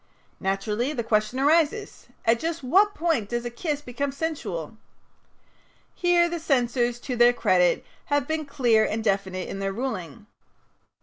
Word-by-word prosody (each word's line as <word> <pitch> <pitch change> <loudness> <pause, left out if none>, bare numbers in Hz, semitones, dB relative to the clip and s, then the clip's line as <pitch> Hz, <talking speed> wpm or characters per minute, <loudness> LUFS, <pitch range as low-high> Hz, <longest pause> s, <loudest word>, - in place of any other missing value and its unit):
Naturally 210 +7 -1
the 240 -5 -2
question 215 +3 0
arises: 320 +8 +1 0.2
"At 230 +1 +3
just 330 0 -3
what 395 +10 +3
point 310 -11 0
does 240 0 -2
a 240 - -3
kiss 295 +3 -3
become 275 +3 -3
sensual?" 270 - -4 1.2
Here 350 -1 +3
the 340 0 -4
censors, 245 -5 +1
to 255 - -4
their 240 0 +6
credit, 180 -6 +2 0.2
have 285 -2 0
been 315 -1 -2
clear 240 -6 +3
and 220 +1 -2
definite 190 -3 -1
in 195 - -6
their 195 0 -1
ruling. 225 -3 -5
245 Hz, 145 wpm, -25 LUFS, 215-305 Hz, 1.2 s, their